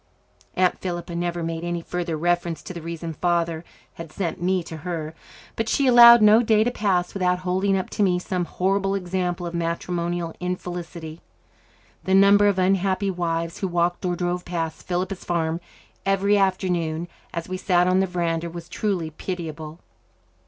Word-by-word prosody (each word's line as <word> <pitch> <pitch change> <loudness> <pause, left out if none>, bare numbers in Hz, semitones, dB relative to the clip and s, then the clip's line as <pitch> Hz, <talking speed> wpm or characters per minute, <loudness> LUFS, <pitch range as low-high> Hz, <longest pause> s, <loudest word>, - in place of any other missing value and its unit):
Aunt 185 -1 +2
Philippa 175 -1 -4
never 175 0 -2
made 165 0 -3
any 175 -1 -3
further 175 -2 -3
reference 175 -1 -1
to - - -7
the 170 - -7
reason 165 0 -5
Father 170 -1 0 0.3
had 165 -2 -9
sent 170 -1 -3
me 185 0 +1
to 160 -1 -8
her, 160 -1 -5 0.4
but 225 0 -2
she 275 - +2
allowed 235 -2 +9
no 215 +2 +7
day 220 -2 +3
to 245 - 0
pass 190 -6 0
without 180 -2 +1
holding 190 +2 +1
up 185 - -2
to - - -2
me 185 -3 +3
some 180 0 -2
horrible 195 +2 0
example 180 -1 -2
of 170 - -5
matrimonial 170 0 -2
infelicity. 175 -2 -5 0.8
The 190 - +3
number 200 +1 +6
of 200 -2 +2
unhappy 190 +1 +1
wives 165 -1 -2
who 195 - -1
walked 175 0 0
or 180 -1 0
drove 175 0 -2
past 165 -2 -4
"Philippa's 185 +1 -2
Farm" 165 -1 -1 0.4
every 195 +1 +2
afternoon, 180 -4 0 0.2
as 170 -1 -5
we 185 0 -4
sat 180 -2 +2
on 185 +1 +3
the 190 - +2
verandah, 170 -2 -2
was 170 0 -8
truly 180 -7 -2
pitiable. 160 -2 -6
175 Hz, 165 wpm, -24 LUFS, 170-190 Hz, 0.8 s, allowed